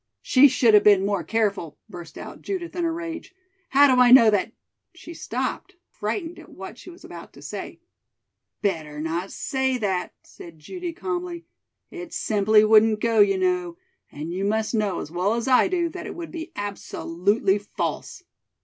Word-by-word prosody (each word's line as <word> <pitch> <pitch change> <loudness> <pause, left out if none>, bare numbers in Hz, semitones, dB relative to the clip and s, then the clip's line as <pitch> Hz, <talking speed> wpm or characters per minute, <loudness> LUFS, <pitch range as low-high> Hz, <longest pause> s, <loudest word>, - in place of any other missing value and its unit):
"She 275 +2 +6
should 245 -4 +3
have 210 -1 +7
been 200 -2 +5
more 200 -3 -1
careful," 200 -4 -2
burst 175 -5 -11
out - - -9
Judith 370 -4 -5
in 350 -1 -1
a 330 - 0
rage. 335 +3 -7 0.3
"How 280 +1 +6
do 250 - +4
I 245 - +6
know 240 -3 +8
that 205 +2 0 0.2
" 365 - -51
she 340 0 -11
stopped, - - -4 0.2
frightened 340 -3 -4
at 320 - -14
what 190 +5 -10
she - - -12
was 350 0 -14
about - - -11
to - - -15
say. - - -7 0.8
"Better 155 -7 -2
not 165 +4 -3
say 265 -1 -1
that," 190 -5 -2
said 170 -2 -13
Judy 350 - -6
calmly. 350 -1 -5 0.5
"It 355 -2 -9
simply 210 0 +3
wouldn't 215 0 +5
go, 230 0 +1
you 200 -2 +5
know, 180 -2 -1 0.3
and 155 +4 -6
you 190 +2 -3
must 220 +3 -1
know 210 -3 -1
as 150 - -8
well 185 +6 0
as 235 +2 -3
I 255 -1 +5
do 355 -2 0
that 365 +2 -8
it - - -7
would 340 -1 -7
be 335 0 -7
absolutely 200 0 -1
false." 205 - -5
220 Hz, 180 wpm, -24 LUFS, -, 0.8 s, know